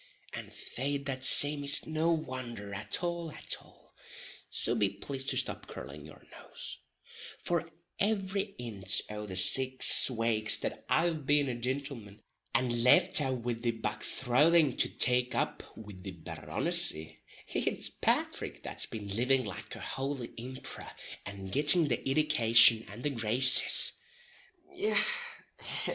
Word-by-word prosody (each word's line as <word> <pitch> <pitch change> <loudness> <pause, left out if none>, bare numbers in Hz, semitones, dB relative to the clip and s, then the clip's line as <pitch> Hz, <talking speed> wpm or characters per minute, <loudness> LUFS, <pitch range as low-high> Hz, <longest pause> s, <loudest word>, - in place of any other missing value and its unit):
And - - -9
fait 140 +2 -6
that 130 -2 -5
same 145 +2 +5
is 140 0 +2
no 160 +2 -1
wonder 125 -9 -6
at 105 - -3
all 170 -2 -4
at - - -4
all - - -24 0.6
(so - - -1
be 105 -4 0
plased 135 +6 -5
to - - -1
stop - - -3
curlin' 75 +1 -11
your 80 - -17
nose), - - -10 0.6
for 170 -1 -3 0.3
every 200 -1 -2
inch 100 -5 -1
o' 105 0 -7
the 95 - -8
six 130 +11 +5
wakes 115 -3 +2
that - - -6
I've 160 -4 -1
been 145 -1 +2
a 130 - -3
gintleman, 120 -4 -6 0.3
and 120 -1 0
left 125 +4 +4
aff 130 -3 -3
wid 120 -1 -4
the 120 - -2
bog 110 -2 -5
throthing 145 +3 +1
to - - +2
take 125 0 0
up - - -3 0.2
wid 100 -4 -12
the 95 -1 -8
Barronissy, 80 -1 0 0.3
it's - - -1
Pathrick - - -3
that's - - -3
been 105 -3 -9
living 125 +5 0
like 100 -4 -9
a - - -11
houly 135 -2 -6
imperor, 130 +3 -9 0.3
and 100 -1 -9
gitting 150 - +3
the 120 - 0
iddication 115 -6 +4
and 105 +5 -11
the 145 - -1
graces. 120 +2 +7
125 Hz, 140 wpm, -29 LUFS, 105-145 Hz, 0.6 s, graces